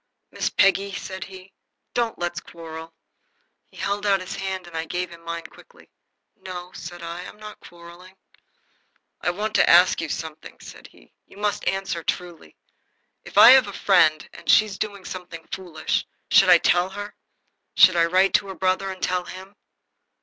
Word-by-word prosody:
"Miss - - -2
Peggy," 195 0 +2
said 190 0 -6
he, 190 0 -13 0.4
"don't 235 -2 -1
let's 175 0 -3
quarrel." 165 -2 -10 0.8
He - - -19
held 200 +1 -2
out 200 -2 +2
his 185 - -7
hand, 190 -1 -4
and 175 -1 -12
I 160 0 -3
gave 180 +2 -4
him 170 0 -13
mine 170 0 -5
quickly. - - -17 0.4
"No," 180 -1 -9
said 175 -2 -9
I, 170 +1 -6
"I'm - - -13
not 215 0 -11
quarrelling." 175 +2 -15 1.1
"I - - 0
want 210 +4 -3
to - - +4
ask 175 +1 +6
you 165 - -4
something," 155 0 -7
said - - -12
he. - - -23
"You - - -18
must 205 0 -2
answer, 190 -3 -2
truly. 175 +1 -5 0.7
If - - -10
I - - +10
have 260 -4 +6
a 200 - -7
friend 160 -7 +3
and - - -11
she's 210 -3 +4
doing 200 -3 -5
something 175 -3 -8
foolish, 175 -5 -3 0.2
should - - +6
I - - +9
tell 175 +1 +2
her? 205 +2 -7 0.6
Should 185 -2 +7
I 170 -1 +4
write 185 +3 +2
to 200 - +2
her 190 - -7
brother 185 +1 0
and 190 -1 -8
tell 180 -1 0
him?" 190 +3 -11
185 Hz, 175 wpm, -23 LUFS, 170-195 Hz, 1.1 s, I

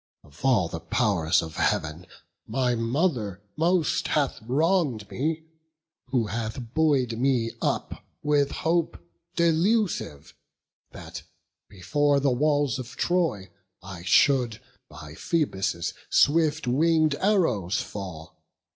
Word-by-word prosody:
Of 70 +1 -18
all 120 -10 +3
the 80 - -6
pow'rs 85 -1 +1
of 80 -1 -8
Heav'n, 80 +3 -1 0.4
my 125 -2 0
mother 115 - -1 0.2
most 170 +1 +1
Hath 140 -6 0
wrong'd 135 - 0
me, 160 +4 -2 0.6
who 125 -3 0
hath 115 +3 -5
buoy'd 135 -7 +1
me 125 -3 +1
up - - -2 0.2
with 145 -1 +2
hope 165 +2 -1 0.4
Delusive, 170 - 0 0.6
that, - - -9 0.5
before 140 +10 +1
the 140 -1 +2
walls 145 -1 +1
of 125 -1 -8
Troy, 160 - 0 0.3
I 95 -2 -8
should 120 - +3 0.3
by 75 +1 -11
Phoebus' 95 - -1 0.2
swift 155 0 +3
wing'd 155 +4 +3
arrows 125 - +1
fall. 85 -5 -8
130 Hz, 110 wpm, -26 LUFS, 100-155 Hz, 0.6 s, all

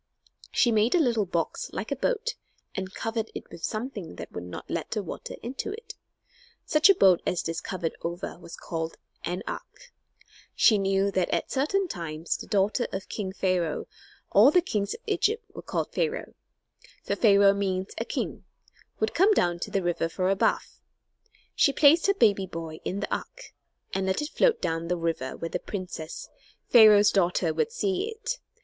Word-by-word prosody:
She 240 - +3
made 220 +5 +3
a - - +4
little 235 - +2
box 170 -2 -2
like 215 - -4
a - - +1
boat 475 - -1 0.4
and 190 0 -4
covered 225 +1 -3
it - - -7
with 165 - -11
something 215 - -4
that 85 -1 -8
would 90 - -6
not 90 - -8
let 170 - -3
the 210 -2 -2
water 175 - -7
into 255 - -4
it. 435 0 -9 0.7
Such 305 +5 +5
a 395 - +7
boat 190 - +5
as 175 - -1
this 165 0 -3
covered 170 -4 -3
over 170 0 -5
was 170 - -10
called 160 -1 -4 0.3
"an 180 +2 -3
ark." - - -8 0.6
She 215 -4 +5
knew 195 0 +1
that 185 -2 0
at - - -1
certain 365 +9 +1
times 165 - -3
the - - -8
daughter 210 +4 +1
of 190 -1 -5
king 195 -3 -3
Pharaoh 185 -4 0 0.5
all 210 +7 +7
the 360 - +5
kings 210 - -1
of - - -13
Egypt 440 +1 0
were - - -8
called - - -3
Pharaoh, 475 0 -2 0.7
for - - -1
Pharaoh 200 -3 +6
means 190 -1 -2
a - - 0
king - - -4 0.6
would 220 0 0
come 400 +4 +4
down 175 -1 +1
to - - -4
the 195 - -1
river 175 -1 0
for 185 +2 0
a - - +3
bath. - - 0 0.7
She 280 - +4
placed 310 +5 +5
her 395 - +3
baby 200 - +3
boy 165 -3 -7
in 195 - -3
the - - -1
ark, - - -9 0.4
and 190 0 -1
let 190 - +1
it 295 - -4
float 480 -2 +3
down 165 +1 -2
the 180 +1 0
river 165 -6 -2
where 165 - -4
the - - -2
princess, 175 -5 -6 0.4
Pharaoh's 210 -3 +8
daughter, 175 -3 +2
would 450 - 0
see 400 -3 -1
it. 455 +3 -4
200 Hz, 185 wpm, -27 LUFS, 175-280 Hz, 0.7 s, Pharaoh's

